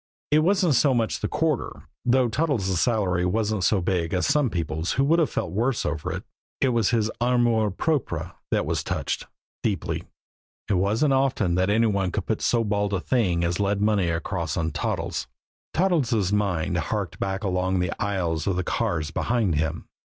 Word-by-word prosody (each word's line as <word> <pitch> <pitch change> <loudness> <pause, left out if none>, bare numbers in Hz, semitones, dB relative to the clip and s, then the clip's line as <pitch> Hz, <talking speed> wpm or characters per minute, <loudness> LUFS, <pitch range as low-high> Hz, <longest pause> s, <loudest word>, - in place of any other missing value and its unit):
It 150 - +5
wasn't 180 0 +3
so 135 +1 +4
much 115 -2 0
the - - -1
quarter, - - -1 0.2
though 125 0 +3
Toddles' 110 - 0
salary 95 -7 +1
wasn't 105 +1 0
so 100 0 +3
big 85 -1 0
as 90 - +1
some 145 -4 +2
people's 80 -2 -2
who 135 - +2
would 160 +5 +3
have 160 - +2
felt - - -3
worse 115 +6 0
over 80 -2 -2
it, - - -4 0.4
it 135 - +3
was 115 -5 +2
his 110 -2 +1
amour 120 -3 +3
propre 90 - -1 0.2
that - - +1
was - - -1
touched - - -3 0.3
deeply. - - -2 0.6
It 105 - +1
wasn't 105 +10 +2
often 130 -9 +1
that 95 +2 +2
any 110 +3 +3
one 100 -4 0
could 100 - -3
put 110 - -1
so 115 -1 +2
bald 105 -1 0
a - - 0
thing 90 -6 +1
as 85 +2 0
lead 100 0 +1
money 105 -4 +2
across 85 0 -2
on 80 -1 0
Toddles. - - -2 0.4
Toddles' 130 - +1
mind 100 -6 0
harked - - -3
back 95 +1 -2
along 95 -1 0
the 90 -1 0
aisles 90 -6 -1
of 95 - +1
the 90 - -1
cars 80 -2 -1
behind 110 0 0
him. 80 +1 -1
100 Hz, 180 wpm, -25 LUFS, 90-120 Hz, 0.6 s, It